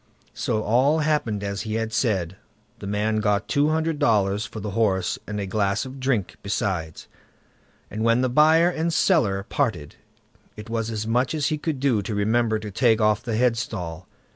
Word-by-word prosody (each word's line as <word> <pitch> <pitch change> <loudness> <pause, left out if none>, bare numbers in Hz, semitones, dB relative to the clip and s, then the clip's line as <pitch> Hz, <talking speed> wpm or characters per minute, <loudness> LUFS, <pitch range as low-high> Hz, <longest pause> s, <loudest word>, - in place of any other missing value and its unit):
So 110 -1 -1
all 135 +8 +3
happened 145 -10 0
as 100 0 -3
he 110 -1 -4
had 110 0 -2
said; 95 -6 0 0.4
the 100 - -7
man 105 +2 0
got 105 0 0
two 145 +2 +2
hundred 160 -1 0
dollars 105 -4 +2
for 110 - -8
the 105 0 -5
horse 95 -4 0
and 105 0 -4
a 100 - -2
glass 100 +1 0
of 130 +1 -9
drink 125 -8 -1
besides, 95 -5 -3 0.8
and 110 +2 -3
when 115 +2 +3
the 130 - +2
buyer 155 +6 +4
and 165 0 -1
seller 115 - +2
parted, 105 - -2 0.6
it 105 +2 -9
was 115 -1 -1
as 110 -1 -3
much 125 +5 0
as 145 -2 0
he 155 - -2
could 150 -3 -3
do 130 -6 +2
to 105 +2 -4
remember 110 +2 +1
to 105 -1 -7
take 115 +1 +3
off 105 0 +2
the 115 -2 -3
headstall. 110 -8 -2
110 Hz, 185 wpm, -24 LUFS, 100-130 Hz, 0.8 s, buyer